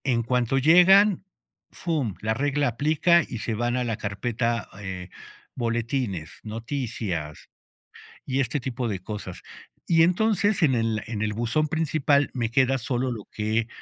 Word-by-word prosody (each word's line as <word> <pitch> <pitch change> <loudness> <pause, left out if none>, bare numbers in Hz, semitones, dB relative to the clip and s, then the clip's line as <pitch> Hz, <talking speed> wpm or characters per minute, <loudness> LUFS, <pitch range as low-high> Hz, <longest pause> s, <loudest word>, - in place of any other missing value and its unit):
En 120 -3 +1
cuanto 125 +2 +1
llegan, 180 +7 +6 0.5
fum, 145 - -2
la 110 +1 0
regla 145 +3 0
aplica, 155 +7 +3
y - - -5
se 110 +1 -3
van 120 +3 -1
a 125 - 0
la 115 -3 -2
carpeta, 115 +3 -2
eh, 95 -2 -6 0.5
boletines, 115 - -2
noticias 110 - -4 0.8
y 135 0 -1
este 135 +2 0
tipo 125 -1 -3
de 100 -4 -3
cosas. 95 -1 -7 0.5
Y, 165 -1 +5
entonces, 205 +2 +2
en 140 -6 +4
el 115 -2 0
en 110 -2 -3
el 105 -1 -1
buzón 120 +8 0
principal, 150 -2 +1
me 115 -3 -2
queda 130 +2 +3
solo 125 +1 -2
lo 110 -4 -6
que 110 +1 -1
120 Hz, 150 wpm, -25 LUFS, 110-145 Hz, 0.8 s, llegan